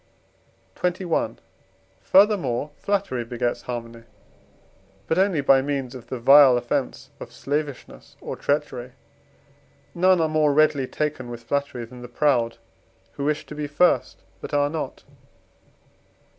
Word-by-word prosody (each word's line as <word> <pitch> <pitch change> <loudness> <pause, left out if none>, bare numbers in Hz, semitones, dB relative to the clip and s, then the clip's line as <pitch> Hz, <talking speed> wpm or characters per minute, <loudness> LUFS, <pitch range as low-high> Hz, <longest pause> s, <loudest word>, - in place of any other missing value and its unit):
XXI. 180 -1 -1 0.6
Furthermore, 175 - +3
flattery 195 -12 -2
begets 120 +1 -3
harmony; 115 -1 -7 1.0
but 160 - 0
only 190 -6 +2
by 135 -1 +5
means 135 -2 -3
of 125 -3 -11
the 130 - -4
vile 135 +1 +7
offence 120 0 -3
of - - -9
slavishness 145 -1 -5
or - - -6
treachery. 130 -4 -2 1.0
None 185 +1 +3
are 160 - +2
more 155 -2 +2
readily 145 -3 +3
taken 145 -5 -3
with 120 0 -8
flattery 140 -2 -2
than 125 +2 -13
the 120 - -8
proud, 120 -3 +1 0.5
who 140 - -5
wish 150 0 -1
to - - -10
be 150 0 -4
first, 160 +5 +1 0.2
but 145 - -5
are 145 0 +2
not. 160 -1 -5
140 Hz, 130 wpm, -23 LUFS, 125-155 Hz, 1.0 s, vile